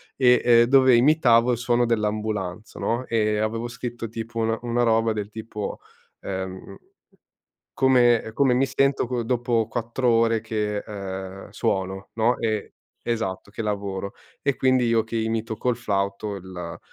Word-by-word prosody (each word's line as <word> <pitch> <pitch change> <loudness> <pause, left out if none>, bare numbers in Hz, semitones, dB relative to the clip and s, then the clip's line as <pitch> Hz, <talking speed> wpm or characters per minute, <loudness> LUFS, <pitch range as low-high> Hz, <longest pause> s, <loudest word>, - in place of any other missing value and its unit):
e, 125 -2 +4
ehm, 120 -1 +6
dove 130 0 +5
imitavo 125 -3 +4
il 120 - 0
suono 120 +1 +1
dell'ambulanza, 105 -2 -2
no, 120 +3 -1
e 105 -3 +1
avevo 115 +2 -1
scritto 120 -1 -6
tipo 115 +1 -6
una 115 0 +1
una 120 0 0
roba 115 -1 +3
del 105 -1 -3
tipo, 110 -1 -6 0.4
uhm 95 -1 -6 1.0
"come 125 -3 +5
ehm, 110 - -9
come 135 0 +3
mi 130 +2 +3
sento 135 0 +1
co 120 -1 -2
dopo 120 -2 0
4 120 +2 -1
ore 115 -1 +3
che, 105 -2 -2
uhm, 95 -2 -7
suono", 95 0 -2
no. 115 +2 +2
E 110 -2 -2 0.3
esatto, 105 -5 -3
che 110 - -5
lavoro. 100 -2 -3 0.3
E 140 -2 +1
quindi 130 -1 +2
io 115 -1 +2
che 115 +1 -7
imito 110 0 -2
col 125 +3 0
flauto 100 -2 -2
il 90 -3 -8
115 Hz, 150 wpm, -24 LUFS, 105-120 Hz, 1.0 s, ehm